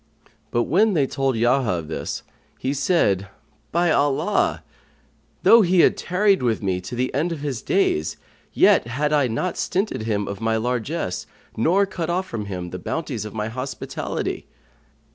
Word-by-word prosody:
But 120 - +1
when 205 - +3
they 145 -4 +3
told 135 -1 -1
Yahya 120 -2 +2
of 85 -3 -4
this, 80 - -4 0.3
he 130 +2 -2
said, 130 - +1 0.4
"By 170 0 +2
Allah, 145 +7 +1 0.8
though 230 - +8
he 180 -2 +4
had - - +5
tarried 195 +2 +2
with 115 -4 0
me 95 -2 0
to 90 +7 -7
the 125 +1 -1
end 155 +6 0
of 160 -4 -4
his 135 -6 -3
days, 80 - +1 0.3
yet - - +4
had 145 +5 -1
I 145 -3 +3
not 120 +11 -2
stinted 195 - -1
him 105 -2 -1
of 100 +1 -6
my 110 0 +1
largesse 120 - -2 0.3
nor 180 - +3
cut 175 -4 -4
off 180 +2 0
from 110 - -4
him 90 -3 -5
the 90 - -5
bounties 125 - -3
of 105 - -8
my 105 0 -2
hospitality!" 130 +4 -4
130 Hz, 165 wpm, -23 LUFS, 110-170 Hz, 0.8 s, though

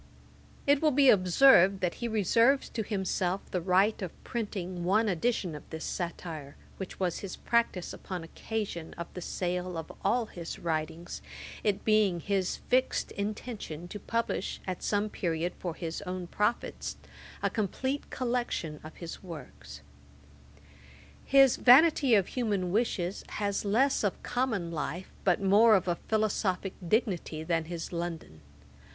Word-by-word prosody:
It 285 0 +4
will 315 - +5
be 275 -2 +6
observed, 195 0 +6
that 180 -2 +1
he 240 - 0
reserves 230 +5 +3
to 225 - -3
himself 190 -3 -1
the 180 - -1
right 190 +5 +3
of 185 -4 -7
printing 185 -6 -4
one 210 +5 +3
edition 190 -1 0
of 150 - -7
this 160 0 -5
satire, 165 -5 -5 0.2
which 190 - -7
was 180 -3 0
his 195 -3 -6
practice 235 -6 0
upon 180 -3 -6
occasion 185 -1 -5
of 170 - -5
the 180 - -6
sale 180 0 -2
of 160 - -6
all 240 -1 +2
his 170 -5 -7
writings; 160 +1 -3 0.4
it 205 -2 0
being 215 -5 +3
his 190 +1 -1
fixed 255 +1 +1
intention 200 -5 -5
to 210 - -6
publish 230 -2 -2
at 185 -2 -4
some 205 0 +1
period, 170 -3 -2
for 175 -3 -4
his 165 0 -4
own 185 -2 -4
profit, 210 +6 -1 0.5
a - - +3
complete 260 +6 -2
collection 240 - -2
of 155 - -10
his 170 -2 -8
works. 145 - -10 1.4
His 270 -2 +5
Vanity 275 -1 +6
of 195 -3 +2
Human 205 -8 -1
Wishes 200 -4 0
has 200 -1 -1
less 245 +7 +2
of 205 - -1
common 225 -9 -1
life, 165 +3 -4
but 180 -3 +3
more 210 +3 +6
of 185 -2 +1
a 175 -1 0
philosophick 205 -3 0 0.2
dignity 180 -8 0
than 165 -1 0
his 170 +1 -6
London. 170 - -5
190 Hz, 145 wpm, -30 LUFS, 175-220 Hz, 1.4 s, be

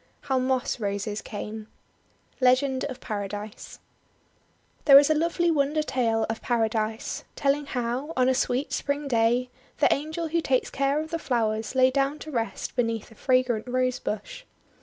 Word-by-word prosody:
HOW 265 -2 0
MOSS 255 0 0
ROSES 205 0 -2
CAME 215 0 -7 0.7
Legend 260 +1 +3
of 260 -2 -6
Paradise 205 0 -6 1.1
THERE 275 -2 +10
is 285 +2 +6
a - - +6
lovely 335 +2 +1
wonder 300 0 +1
tale 230 -6 +1
of 225 0 -4
Paradise, 220 -2 -1
tell 275 -1 +3
ing 290 0 -6
how, 250 +4 -2
on 255 0 +4
a 260 - +4
sweet 255 +1 -1
Spring 285 0 -2
day, 240 0 +2 0.3
the - - +4
Angel 315 +3 -3
who 335 +1 +1
takes 260 -4 0
care 275 +2 +1
of 315 +1 -5
the 330 - -2
flowers 220 -4 -1
lay 260 0 +5
down 275 +2 +1
to 310 - -9
rest 230 -4 -3
be 250 - +3
neath 230 -1 -3
a - - -12
fragrant 255 -1 +1
Rose 255 0 0
Bush. 215 - -5
255 Hz, 165 wpm, -26 LUFS, 225-280 Hz, 1.1 s, THERE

